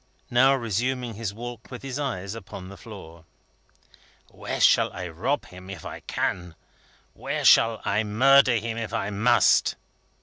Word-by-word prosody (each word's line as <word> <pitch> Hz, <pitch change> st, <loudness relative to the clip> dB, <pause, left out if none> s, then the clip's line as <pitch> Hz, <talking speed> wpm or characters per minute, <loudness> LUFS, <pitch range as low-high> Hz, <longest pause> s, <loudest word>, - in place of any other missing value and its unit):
now, 130 Hz, +3 st, +5 dB
resuming 120 Hz, +1 st, -2 dB
his 110 Hz, -1 st, -4 dB
walk 120 Hz, +2 st, -9 dB
with 125 Hz, 0 st, -9 dB
his 135 Hz, 0 st, -5 dB
eyes 100 Hz, -9 st, -3 dB
upon 95 Hz, -4 st, -9 dB
the 100 Hz, -, -10 dB
floor. 85 Hz, -5 st, -12 dB, 1.1 s
"Where -, -, -5 dB
shall -, -, +4 dB
I 90 Hz, 0 st, -5 dB
rob 125 Hz, -, -2 dB
him, 90 Hz, +1 st, -13 dB
if 95 Hz, -5 st, -9 dB
I -, -, -7 dB
can? 90 Hz, -3 st, -3 dB, 0.6 s
Where -, -, -4 dB
shall 115 Hz, -1 st, +5 dB
I 105 Hz, +2 st, +1 dB
murder 130 Hz, +4 st, +4 dB
him, 115 Hz, +1 st, -3 dB
if 115 Hz, -, -5 dB
I 100 Hz, -, -2 dB
must?" 110 Hz, +5 st, +3 dB
110 Hz, 155 wpm, -25 LUFS, 95-125 Hz, 1.1 s, now